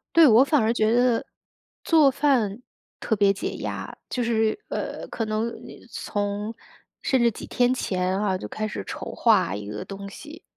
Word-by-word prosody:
对， 330 -2 +8
我 235 +1 +7
反 290 +1 +2
而 220 +1 +2
觉 220 -2 +2
得 245 -1 +3 0.6
做 310 -4 +5
饭 250 -6 +1 0.4
特 220 - 0
别 200 -1 +4
解 195 - -4
压。 - - -5
就 250 - -2
是 225 - +1
呃， - - -4
可 230 - -3
能 215 +1 -1 0.2
你 - - -12
从 205 +1 -3 0.5
甚 260 -2 +2
至 235 - +4
几 - - -9
天 245 0 +2
前 185 -5 -1
啊， 200 -3 0
就 - - -7
开 215 0 -3
始 100 - -5
筹 - - -6
划 95 - +3
一 105 0 -6
个 105 0 -6
东 200 0 -7
西。 315 - -11
220 Hz, 195 characters per minute, -25 LUFS, 200-250 Hz, 0.6 s, 对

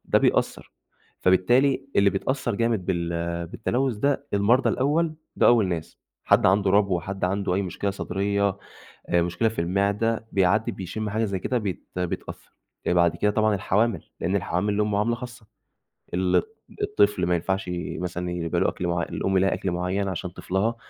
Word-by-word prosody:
ده - - +3
بيأثر، - - 0 0.5
فبالتالي 125 +9 +3
اللي 100 0 +5
بيتأثر 120 +4 -1
جامد 115 -4 0
بال 85 -3 -1 0.4
بالتلوث 120 +6 -1
ده 140 +5 0
المرضى 115 +6 +3
الأول، 155 +4 +1 0.2
ده - - +4
أول 115 -6 +5
ناس، 80 -3 -5 0.3
حد - - +4
عنده 95 +1 +3
ربو، 100 -3 +3
حد 95 +2 -4
عنده 95 0 0
أي 100 - +1
مشكلة 100 +2 -2
صدرية، 100 +1 -1 0.5
آآ 85 - +3
مشكلة 90 +7 +1
في 110 - -3
المعدة، 100 +6 0
بيعدي 100 +3 +2
بيشم 100 +3 -5
حاجة 110 +2 0
زي 100 -3 -2
كده 125 +7 -1
بيت 100 -7 -4
بيتأثر، 90 -1 -5 0.4
آآ - - +3
بعد 85 -1 +3
كده 105 +4 +1
طبعًا 110 0 +2
الحوامل، 100 0 +1 0.2
لإن 95 - 0
الحوامل 95 +2 0
ليهم 105 +1 0
معاملة 105 +4 +1
خاصة، 120 -2 -10 0.7
ال 90 -1 +2 0.4
الطفل 100 -3 +2
ما 90 - +2
ينفعش 95 +2 -1 0.3
مثلًا 90 0 -3
يبقى 85 -2 -1
له - - +2
أكل 90 - -3
معيّ 85 0 0
الأم 95 0 0
لها 95 +1 +2
أكل 95 - -2
معيّن 90 +3 -1
عشان 90 -1 -4
طفلها، 95 +6 -1
100 Hz, 165 wpm, -25 LUFS, 90-110 Hz, 0.7 s, اللي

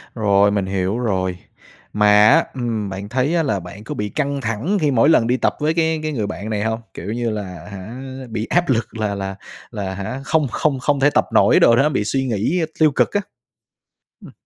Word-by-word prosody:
rồi, 100 -2 +3
mình 100 -2 0
hiểu 95 +2 -1
rồi. 95 -6 -1 0.6
Mà 105 0 +5
á, 165 +4 +5
ừm, 115 -5 -3
bạn 95 +1 -6
thấy 130 +3 0 0.2
là 110 -9 0
bạn 90 +4 -10
có 150 +7 -6
bị 105 -4 -3
căng 140 0 -2
thẳng 115 - -1
khi 150 -2 +2
mỗi 130 +3 +4
lần 115 -8 +4
đi 125 +2 +2
tập - - 0
với 155 +1 +1
cái 160 -1 +1
cái 155 - -2
người 110 -8 -2
bạn 105 +2 -6
này 105 -1 -1
hông? 110 0 -1
Kiểu - - -8
như 120 0 -1
là, 105 -1 -3 0.3
hả, 105 +6 -8 0.3
bị 110 -1 -3
áp 175 +4 +1
lực 115 -2 -1
là 105 -2 -1
là 95 -1 -4 0.4
là, 100 -4 -4
hả, 100 +8 -5
không 155 -1 +1
không 140 0 0
không 140 +2 0
thể 140 +2 +4
tập - - +2
nổi - - +5
đồ 115 - +6
đó, 140 +5 +3
bị 130 -8 0
suy 135 +5 -1
nghĩ 120 - 0 0.2
tiêu 155 -2 +5
cực - - +1
á. 205 - +1 1.0
Ừm. - - -12
115 Hz, 220 wpm, -20 LUFS, 105-140 Hz, 1.0 s, đồ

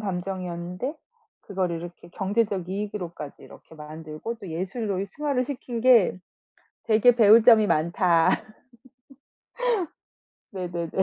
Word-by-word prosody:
감정이었는데 180 - -4 0.5
그거를 185 -4 -2
이렇게 175 0 -10
경제적 195 -1 -1
이익으로까지 190 -7 -6
이렇게 - - -15
만들고 155 +7 -7
또 200 -5 -10
예술로 195 +3 -3
승화를 275 +3 -1
시킨 250 -3 -5
게 240 -7 +5 0.7
되게 230 +2 +4
배울 220 0 +7
점이 225 -3 +7
많다. 170 +1 +3 2.2
네네네. 175 -3 -4
190 Hz, 260 characters per minute, -25 LUFS, 170-225 Hz, 2.2 s, 배울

